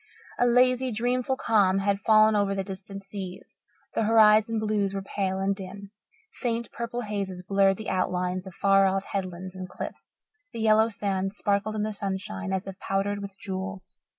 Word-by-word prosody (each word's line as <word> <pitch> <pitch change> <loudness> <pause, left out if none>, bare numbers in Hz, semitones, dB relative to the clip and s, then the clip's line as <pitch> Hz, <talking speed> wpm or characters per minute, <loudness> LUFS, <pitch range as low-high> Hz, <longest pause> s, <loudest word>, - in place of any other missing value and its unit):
A 245 - +4
lazy, 255 +1 +4
dreamful 250 +3 0
calm 200 -6 +3
had 200 0 +1
fallen 215 +1 +5
over 200 -1 +1
the 195 - -1
distant 195 +1 -8
seas; 195 -2 -8 0.3
the 225 - +1
horizon 220 0 +5
blues 210 -2 0
were 195 - -3
pale 190 -1 -2
and 195 +1 0
dim; 195 +1 -9 0.4
faint 235 -2 -3
purple 235 +1 -4
hazes 200 -4 -4
blurred 195 0 +3
the 220 - -4
outlines 185 0 -1
of 185 - -10
far 195 0 +4
off 195 +1 0
headlands 185 -1 -4
and 185 -1 -6
cliffs; - - -8 0.4
the 230 - -5
yellow 220 0 +4
sands 195 -2 -2
sparkled 205 +1 0
in 210 - -1
the 215 0 -2
sunshine 190 - -4
as 190 0 -1
if 195 -1 -8
powdered 200 +1 -1
with 195 -1 -8
jewels. 190 -1 -6
200 Hz, 175 wpm, -27 LUFS, 190-215 Hz, 0.4 s, fallen